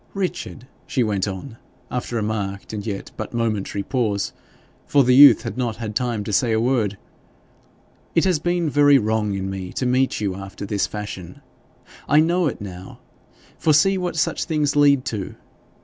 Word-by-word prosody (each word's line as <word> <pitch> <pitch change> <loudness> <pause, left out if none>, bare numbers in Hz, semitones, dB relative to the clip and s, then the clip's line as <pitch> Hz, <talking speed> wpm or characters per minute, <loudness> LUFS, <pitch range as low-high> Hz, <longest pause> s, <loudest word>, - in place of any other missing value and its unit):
'Richard,' 180 -9 -4 0.2
she 130 - +1
went 105 -3 -1
on, 100 +5 -7 0.3
after 120 -1 -3
a 110 - -1
marked 100 -2 -4
and 105 -2 -4
yet 100 -2 -5
but 110 +2 -6
momentary 105 -3 -1
pause, 110 -7 -1 0.5
for 140 -1 +4
the 125 0 +4
youth 135 -4 +8
had 120 +1 -5
not 120 -3 -1
had 110 -2 -6
time 120 -4 -1
to 105 - -5
say 115 +4 +2
a 110 - +2
word, 115 -5 0 1.2
'it 165 - +4
has 185 -5 +2
been 175 +1 0
very 145 -1 +5
wrong 110 -3 0
in 95 0 -3
me 95 -2 -5
to 130 - -2
meet 130 +1 +1
you 100 -3 -1
after 95 +1 -8
this 100 0 -1
fashion. 95 -4 -7 0.7
I 150 - +6
know 170 +2 +2
it 140 - -4
now, 95 -2 -9 0.6
for 155 - +3
see 195 +6 +4
what 180 -3 -2
such 160 - 0
things 150 -4 0
lead 140 -3 +4
to! 105 -4 -4
115 Hz, 180 wpm, -22 LUFS, 100-145 Hz, 1.2 s, youth